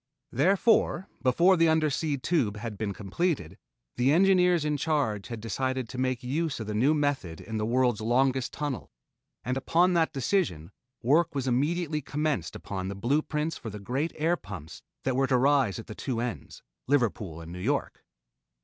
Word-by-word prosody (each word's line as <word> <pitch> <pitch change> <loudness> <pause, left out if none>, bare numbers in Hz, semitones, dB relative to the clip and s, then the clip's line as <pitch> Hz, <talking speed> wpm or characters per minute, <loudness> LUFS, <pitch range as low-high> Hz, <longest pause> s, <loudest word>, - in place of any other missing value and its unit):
Therefore, 190 - +3
before 170 +9 +4
the 165 0 +4
Undersea 155 -1 +1
Tube 125 - 0
had 110 0 -5
been 105 0 -3
completed, 105 - -2 0.4
the 130 +3 +3
engineers 180 -1 +4
in 150 0 +1
charge 140 -9 0
had 115 -2 -6
decided 130 +3 -2
to 125 - -6
make 130 -1 -1
use 150 +3 -1
of 110 - -4
the 105 - -4
new 130 +9 +3
method 140 - -1
in 110 +1 -5
the 105 0 -1
world's 120 -2 +2
longest 130 +3 +1
tunnel, 145 - -4 0.6
and 125 +1 -1
upon 175 +7 +3
that 165 -2 +2
decision 135 - -1 0.3
work 155 +6 +3
was 135 -1 -1
immediately 150 +5 0
commenced 150 +1 -2
upon 95 -2 -5
the 100 - -4
blue 125 +10 +1
prints 155 +1 -2
for 110 - -6
the 105 - -7
great 135 +10 -2
air 165 +3 +1
pumps 95 - -9 0.2
that 130 -1 0
were 135 +1 +2
to 130 - +3
rise 135 -5 +3
at 115 - -7
the - - -8
two 120 +1 -3
ends 120 -1 -5 0.2
Liverpool 110 - 0
and 80 0 -9
New 90 - -7
York. 140 +9 -2
130 Hz, 175 wpm, -28 LUFS, 110-155 Hz, 0.6 s, before